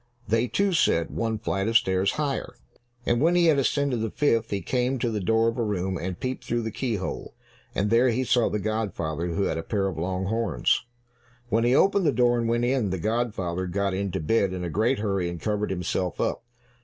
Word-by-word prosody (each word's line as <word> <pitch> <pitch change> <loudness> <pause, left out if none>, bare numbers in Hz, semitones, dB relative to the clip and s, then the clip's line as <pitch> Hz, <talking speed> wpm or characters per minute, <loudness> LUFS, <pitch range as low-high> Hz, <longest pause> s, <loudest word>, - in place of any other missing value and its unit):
They, 115 +3 +2
too, 200 +7 +1
said, 85 - +2
"One 115 -1 -1
flight 100 -2 -2
of 115 0 +5
stairs 95 0 +1
higher." 145 -3 -2 0.5
And 120 +1 +1
when 170 +3 +4
he 175 -1 +4
had 155 -4 +4
ascended 140 -1 +1
the 110 - -1
fifth, 115 -5 +1
he 100 - -1
came 125 +4 0
to 120 -1 -1
the 105 - -1
door 110 +3 +2
of 115 +2 -1
a - - +1
room 95 -3 -1
and 90 +1 -4
peeped 130 0 -3
through 120 0 -1
the 110 - -3
keyhole, 110 -5 -4 0.4
and 105 +2 0
there 120 +2 +5
he 125 +3 0
saw 120 -1 +2
the - - -1
godfather 95 -6 -2
who 90 +4 -1
had 80 - -1
a - - -2
pair 100 +3 -1
of 95 -5 -3
long 90 +2 -2
horns. 100 - 0 0.6
When 115 0 +2
he 125 +2 +4
opened 195 +1 +3
the - - +4
door 120 -1 +3
and 115 -1 -1
went 120 +1 +1
in, 125 -5 +1
the 95 - -2
godfather 95 -3 -1
got 100 +2 -1
into 95 -1 -2
bed 95 +3 +1
in 90 -1 -4
a 85 - -3
great 115 - +1
hurry 100 -4 -1
and 85 -1 -6
covered 105 +1 -1
himself 90 -1 -2
up. - - -1
110 Hz, 220 wpm, -26 LUFS, 95-120 Hz, 0.6 s, of